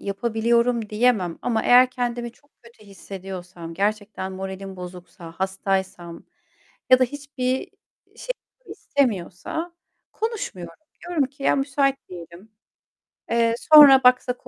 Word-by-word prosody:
yapabiliyorum 230 Hz, +2 st, 0 dB
diyemem 210 Hz, -6 st, +1 dB
ama 225 Hz, -2 st, 0 dB
eğer 250 Hz, +1 st, +6 dB
kendimi 240 Hz, -1 st, -4 dB
çok 285 Hz, +3 st, -30 dB
kötü 235 Hz, -2 st, -19 dB
hissediyorsam, 185 Hz, -3 st, -9 dB
gerçekten 205 Hz, 0 st, -2 dB
moralim 190 Hz, 0 st, -7 dB
bozuksa, 180 Hz, -2 st, -10 dB
hastaysam 190 Hz, -3 st, -3 dB, 0.7 s
ya 255 Hz, -, +8 dB
da 255 Hz, -, +4 dB
hiçbir 260 Hz, -1 st, -4 dB, 0.5 s
şey -, -, -4 dB, 0.3 s
istemiyorsa 260 Hz, -, -3 dB, 0.4 s
konuşmuyorum. 400 Hz, -, -5 dB, 0.3 s
Diyorum 345 Hz, -5 st, 0 dB
ki, 275 Hz, +2 st, -11 dB
"Ya -, -, +2 dB
müsait 275 Hz, 0 st, +1 dB
değilim. 175 Hz, +3 st, -11 dB, 0.8 s
Eee, 230 Hz, 0 st, +2 dB, 0.2 s
sonra 280 Hz, -3 st, +10 dB
baksak 250 Hz, 0 st, +2 dB
230 Hz, 110 wpm, -23 LUFS, 190-255 Hz, 0.8 s, sonra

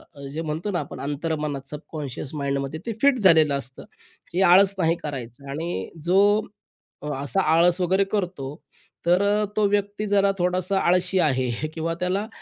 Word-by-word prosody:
अ, 140 Hz, -1 st, -9 dB
जे 160 Hz, -, -3 dB
म्हणतो 160 Hz, +6 st, -3 dB
ना 175 Hz, -, -1 dB
आपण 145 Hz, -, -7 dB
अंतर्मनात 145 Hz, -1 st, -3 dB
सबकॉन्शियस 150 Hz, -2 st, -7 dB
माइंडमध्ये 140 Hz, +1 st, -2 dB
ते 230 Hz, -, -2 dB
फिट 275 Hz, -2 st, +4 dB
झालेलं 160 Hz, -7 st, +5 dB
असतं. 130 Hz, -1 st, -6 dB, 0.5 s
हे 180 Hz, -, +1 dB
आळस 195 Hz, +1 st, +6 dB
नाही 165 Hz, -2 st, +2 dB
करायचं 135 Hz, -1 st, -7 dB
आणि 165 Hz, +5 st, -4 dB, 0.2 s
जो 205 Hz, +4 st, +4 dB, 0.7 s
असा 145 Hz, +8 st, 0 dB
आळस 170 Hz, +3 st, +4 dB
वगैरे 190 Hz, +2 st, +3 dB
करतो 180 Hz, -9 st, -3 dB, 0.5 s
तर 175 Hz, +2 st, +4 dB
अ, 205 Hz, +1 st, +2 dB
तो 215 Hz, -, +3 dB
व्यक्ती 205 Hz, +1 st, -1 dB
जरा 200 Hz, -1 st, +3 dB
थोडासा 185 Hz, +2 st, 0 dB
आळशी 180 Hz, +1 st, +2 dB
आहे. 130 Hz, -2 st, 0 dB
किंवा 165 Hz, +1 st, -2 dB
त्याला 190 Hz, +4 st, -1 dB
170 Hz, 155 wpm, -24 LUFS, 145-195 Hz, 0.7 s, आळस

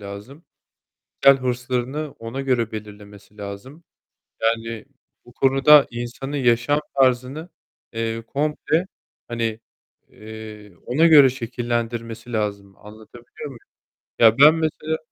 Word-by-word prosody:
lazım. 105 Hz, +10 st, -10 dB, 0.8 s
Kişisel 135 Hz, -1 st, +6 dB
hırslarını 125 Hz, +4 st, -3 dB
ona 115 Hz, +4 st, -5 dB
göre 125 Hz, -4 st, 0 dB
belirlemesi 105 Hz, -1 st, -11 dB
lazım. 105 Hz, +10 st, -9 dB, 0.6 s
Yani, 115 Hz, 0 st, -1 dB, 0.4 s
bu 120 Hz, -, -17 dB
konuda 135 Hz, +3 st, +5 dB
insanı 120 Hz, +4 st, -6 dB
yaşam 125 Hz, +3 st, +2 dB
tarzını, 130 Hz, +4 st, +1 dB, 0.4 s
eee, 115 Hz, 0 st, -3 dB
komple, 150 Hz, +3 st, -1 dB
eee, 175 Hz, +3 st, -1 dB, 0.4 s
hani, 115 Hz, -2 st, -3 dB, 0.5 s
eee, 110 Hz, -1 st, -11 dB
ona 150 Hz, +7 st, +3 dB
göre 145 Hz, -5 st, +8 dB
şekillendirmesi 120 Hz, -1 st, -4 dB
lazım 100 Hz, -3 st, -3 dB
anlatabiliyor 110 Hz, +6 st, -13 dB
muyum? 135 Hz, -4 st, -9 dB, 0.6 s
Ya 115 Hz, +1 st, +5 dB
ben 150 Hz, +3 st, +8 dB
mesela 160 Hz, -1 st, -2 dB
120 Hz, 105 wpm, -22 LUFS, 110-135 Hz, 0.8 s, göre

